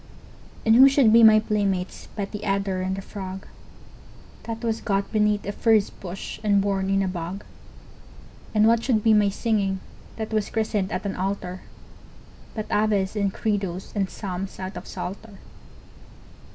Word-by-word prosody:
And 220 0 +5
who 265 +3 +9
should 265 -5 +4
be 230 - +8
my 220 -1 +8
playmates 200 -4 -2
but 200 -2 -4
the 210 - -6
adder 195 -2 -1
and 190 +1 -1
the 195 - -6
frog, 190 -1 -7 1.0
That 230 0 -5
was 225 -1 -1
got 195 -1 -1
beneath 210 -1 +1
a 205 - -2
furze 220 -1 +2
bush 185 0 -7
and 205 -1 +3
born 195 -1 0
in 195 0 +2
a - - -1
bog? 180 +2 -5 1.1
And 215 0 +5
what 230 0 +3
should 225 -5 +1
be 225 - +5
my 210 -1 +4
singing, 200 -2 0 0.4
that 220 0 -5
was 215 -2 0
christened 215 -3 -1
at 185 - -3
an 200 - -2
altar, 185 -1 -3 0.9
But 215 -2 -3
Aves 210 -2 +1
and 200 -2 0
Credos 195 -4 -3
and 195 -2 0
Psalms 195 -1 -6
out 190 +1 -5
of - - -8
Psalter? 195 +3 -7
200 Hz, 165 wpm, -24 LUFS, 190-215 Hz, 1.1 s, who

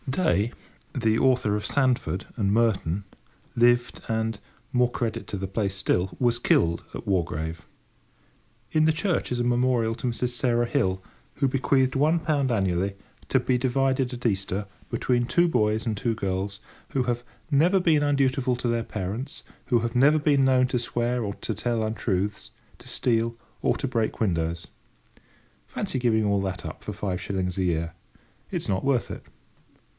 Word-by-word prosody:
Day, 130 - +1 0.4
the 115 -4 +2
author 125 -5 +3
of 105 - -3
Sandford 130 -8 +1
and 100 -4 +1
Merton, 100 -5 +1 0.5
lived 120 +1 +3
and—more 115 +2 -1
credit 115 -3 -2
to 100 - -4
the 95 +1 -3
place 100 0 -1
still—was 100 +6 +1
killed 85 -7 +2
at - - -7
Wargrave. 80 -3 -1 1.1
In 155 - +4
the 160 - +5
church 165 0 -1
is 125 - 0
a - - +1
memorial 120 -2 +2
to 125 - -4
Mrs. 120 +1 -1
Sarah 120 -1 +1
Hill, 95 -8 0 0.3
who 135 - +2
bequeathed 130 0 +2
1 155 +5 +3
pound 145 -5 +1
annually, 95 -2 0 0.3
to 130 - +4
be 125 0 +1
divided 130 0 +1
at 125 0 -8
Easter, 100 -1 0 0.2
between 120 -1 +1
two 175 +5 +3
boys 110 -7 +1
and 110 -2 0
two 115 +3 -1
girls 100 0 -2 0.3
who 130 - 0
"have 120 -1 -1 0.3
never 170 +7 +4
been 160 -5 +3
undutiful 135 -3 +2
to 125 - -2
their 115 -1 +1
parents; 105 +7 -5 0.2
who 120 - +3
have 115 +1 -3
never 145 +5 +5
been 145 -2 +3
known 130 -1 +4
to 125 - 0
swear 120 +1 -1
or 100 -1 -3
to 110 - -4
tell 115 +2 -1
untruths, 105 -2 -2 0.3
to - - -13
steal, 115 -1 0 0.2
or - - +1
to 135 - -2
break 115 -4 -1
windows." 85 -5 -1 1.0
Fancy 130 - -2
giving 115 -3 +2
up - - +2
all 100 -1 +2
that 90 -5 -5
for - - -4
five 95 -3 -3
shillings 95 -2 -2
a 95 - +1
year! 85 -1 -1 0.6
It - - -2
is - - -4
not 95 -1 0
worth 135 -3 +1
it. - - -7
115 Hz, 165 wpm, -26 LUFS, 100-130 Hz, 1.1 s, the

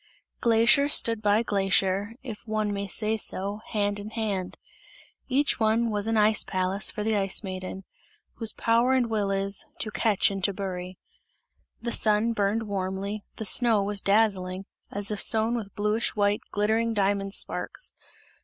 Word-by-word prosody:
Glacier 235 +5 +4
stood 230 -6 +3
by 210 +1 +2
glacier, 195 0 +1
if 230 -3 -9
one 215 -1 -1
may 200 0 -3
say 215 +3 +1
so, 200 0 -2
hand 205 -1 -1
in 205 +1 -7
hand; 210 -5 -3 0.7
each 275 +1 +1
one 225 +1 +2
was 205 0 0
an 225 0 +1
ice 215 0 +4
palace 185 +2 -1
for 210 - -4
the 220 0 0
Ice 195 +1 +1
Maiden, 185 0 -6 0.5
whose 225 -2 0
power 235 +3 +2
and 245 -3 +1
will 210 -3 0
is: 195 0 -1
"to 215 - 0
catch 210 -2 +2
and 195 -1 -5
to 200 - +2
bury." 185 -2 -6 0.9
The 235 - -2
sun 215 +1 +2
burned 210 +1 0
warmly, 200 0 -4
the 220 - -6
snow 225 0 +3
was 200 0 0
dazzling, 195 -3 +1 0.2
as 205 +1 -3
if 210 - -1
sown 225 +2 +4
with 210 -4 -6
bluish 210 +2 -1
white, 205 0 +1
glittering 220 +2 0
diamond 195 0 0
sparks. - - -1
210 Hz, 160 wpm, -26 LUFS, 195-225 Hz, 0.9 s, Glacier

